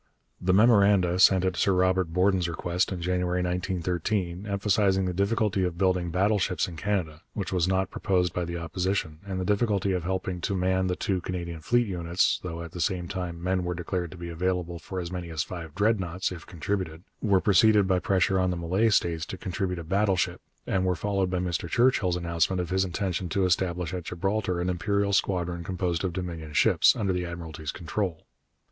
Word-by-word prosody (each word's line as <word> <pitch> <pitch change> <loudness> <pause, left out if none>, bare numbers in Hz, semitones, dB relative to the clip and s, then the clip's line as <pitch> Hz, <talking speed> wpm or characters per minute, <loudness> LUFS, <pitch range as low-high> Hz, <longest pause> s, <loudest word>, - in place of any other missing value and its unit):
The 90 - +2
memoranda 100 -4 +5
sent 95 -1 +6
at 95 -1 0
Sir 95 - +2
Robert 95 0 +2
Borden's 90 0 +2
request 85 +3 -1
in 90 -2 -4
January 90 0 0
1913, 90 +1 -2
emphasizing 100 -1 +2
the 90 - -1
difficulty 100 0 +1
of 90 -2 -2
building 90 -2 +1
battleships 95 +1 +1
in 90 - -8
Canada 85 -4 -2
which 100 -2 -3
was 90 -1 +2
not 95 0 0
proposed 90 -3 0
by 90 - -1
the 85 0 -4
Opposition 85 -1 -2
and 95 -1 -3
the 90 - -2
difficulty 100 -1 +1
of 90 -2 -1
helping 95 0 -2
to 100 - -1
man 95 0 +1
the 90 - 0
two 95 -1 -1
Canadian 85 -2 -5
fleet 120 +9 +2
units 90 -3 +1
though 85 -2 -5
at 85 - -9
the 90 -1 -5
same 90 +1 -1
time 85 -2 -5
men 90 0 0
were 90 0 -2
declared 90 0 -3
to 95 - -11
be 85 0 -6
available 90 0 -2
for 95 +3 -6
as 85 -1 -5
many 90 -2 -5
as 80 -1 -1
five 85 -4 -8
Dreadnoughts, 95 -4 0
if 85 -3 -9
contributed 85 -1 -3 0.2
were 100 -3 +3
preceded 105 +1 +4
by 95 -1 +2
pressure 95 -2 +2
on 90 0 +2
the 90 - -2
Malay 95 +7 +1
States 85 -6 +1
to 95 - -6
contribute 90 0 -3
a 85 - -5
battleship, 95 +1 +1 0.2
and 95 -1 0
were 90 -1 +1
followed 95 +1 0
by 90 - -1
Mr 85 -2 -2
Churchill's 110 -5 +3
announcement 85 +1 0
of 90 0 -3
his 95 0 +2
intention 90 -1 -2
to 95 +3 +1
establish 90 -1 0
at 90 -3 -4
Gibraltar 95 +1 -1
an 90 - -1
Imperial 100 +3 0
Squadron 90 -3 0
composed 90 -2 -2
of 95 - 0
Dominion 85 -4 -5
ships, - - +5
under 100 -4 0
the 90 0 -1
Admiralty's 80 -3 -6
control. 90 0 -3
90 Hz, 195 wpm, -27 LUFS, 85-95 Hz, 0.2 s, sent